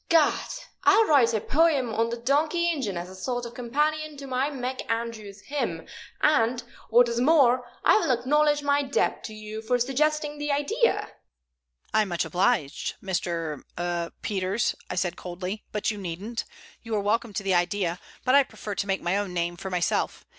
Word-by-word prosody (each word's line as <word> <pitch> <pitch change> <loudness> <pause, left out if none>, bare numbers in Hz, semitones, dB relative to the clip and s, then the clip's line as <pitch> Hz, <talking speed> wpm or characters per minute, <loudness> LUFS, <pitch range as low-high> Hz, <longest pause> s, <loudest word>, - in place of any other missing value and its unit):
Gad! 325 -3 +3 0.3
I'll 450 - +6
write 270 - +5
a 220 - +1
poem 280 -2 +2
on 230 +1 +1
the 235 - -3
donkey 305 +8 +2
engine 255 - -2
as 175 +1 -4
a 185 - -11
sort 245 +6 -3
of 235 - -8
companion 300 +5 -1
to 275 - -8
my 265 +1 0
McAndrews 230 -6 -4
Hymn, 290 +5 -3 0.4
and, 245 -4 +3 0.3
what 240 +2 +6
is 235 0 -1
more, 255 -4 +4 0.2
I - - +7
will - - -1
acknowledge 295 +4 +2
my 285 0 +3
debt 275 -1 0
to 215 - -7
you 215 +1 -7
for 245 +3 +1
suggesting 295 +4 0
the 295 0 -1
idea." 410 +13 +1 0.8
"I'm 215 -1 +3
much 175 -2 -1
obliged, 175 - 0
Mr. 170 -5 -2 0.2
er 175 -1 -2
Peters," 195 +2 0 0.2
said 175 -1 0
I, - - -14
coldly, 180 +4 -5
"but 210 +1 0
you 210 - -6
needn't. 195 +6 -4 0.4
You 225 -2 -3
are - - +2
welcome 225 +3 0
to 200 - -3
the 195 -1 +1
idea, 175 0 +1 0.3
but 255 - +3
I 280 - +8
prefer 215 -5 -6
to 200 +1 -2
make 195 0 -1
my 175 +3 +1
own 200 -3 -3
name 170 0 -1
for 190 +3 -6
myself. 180 -2 -1
230 Hz, 180 wpm, -26 LUFS, 195-280 Hz, 0.8 s, I